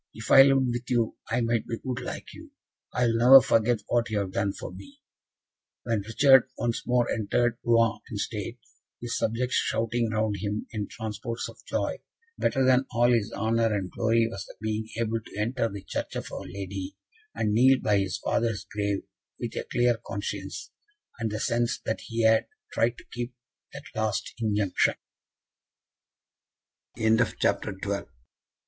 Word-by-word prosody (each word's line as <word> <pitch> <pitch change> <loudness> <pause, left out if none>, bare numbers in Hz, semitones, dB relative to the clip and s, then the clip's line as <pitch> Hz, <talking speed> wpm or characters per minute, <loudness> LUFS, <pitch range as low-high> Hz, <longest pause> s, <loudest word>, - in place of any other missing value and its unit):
If 115 - -6
I 135 - +10
lived 135 -2 +4
with 120 0 -5
you, 120 -3 +1
I 120 +2 +1
might 115 -1 0
be 115 - -3
good 125 0 -4
like - - -7
you. 315 -1 -12 0.4
I 125 - +1
will 115 -1 +2
never 130 +3 +10
forget 115 -1 +2
what 120 0 +1
you 110 - -1
have 100 -2 -1
done 100 +1 0
for 95 - -7
me." 95 +2 -12 0.9
When 115 -3 0
Richard 130 +5 +5
once 120 +1 -2
more 125 -1 +3
entered 115 +2 0
Rouen 115 -2 +3
in 110 - -5
state, 105 +3 -4 0.4
his 120 -1 -3
subjects 125 +3 -1
shouting 115 +1 0
round 110 -2 0
him 105 +1 -3
in 105 -3 -3
transports 115 +1 -5
of - - -13
joy, - - -1 0.4
better 135 -1 +1
than 130 +1 +4
all 120 +1 +3
his 110 -3 +1
honour 115 +2 +1
and 95 -3 -2
glory 115 0 +2
was 100 -4 -6
the - - -13
being 110 0 -3
able 115 -1 0
to 105 - -9
enter 115 +2 0
the 100 -2 -8
Church - - -4
of - - -5
our - - -6
Lady, 95 0 -6 0.4
and 105 - 0
kneel 130 +4 +5
by 105 -2 +2
his 95 -2 -1
father's 115 -3 -1
grave, 100 -1 -2 0.4
with - - -5
a - - -3
clear 120 -1 +3
conscience, 100 -1 -5 0.5
and 115 -1 -1
the 110 0 -3
sense 120 +1 0
that 110 - -2
he 115 0 -1
had 110 0 +4 0.3
tried 120 +1 +1
to - - -14
keep 120 +1 -6 0.4
that - - -9
last 110 -3 -1
inju 105 -3 0
115 Hz, 165 wpm, -27 LUFS, 105-120 Hz, 0.9 s, I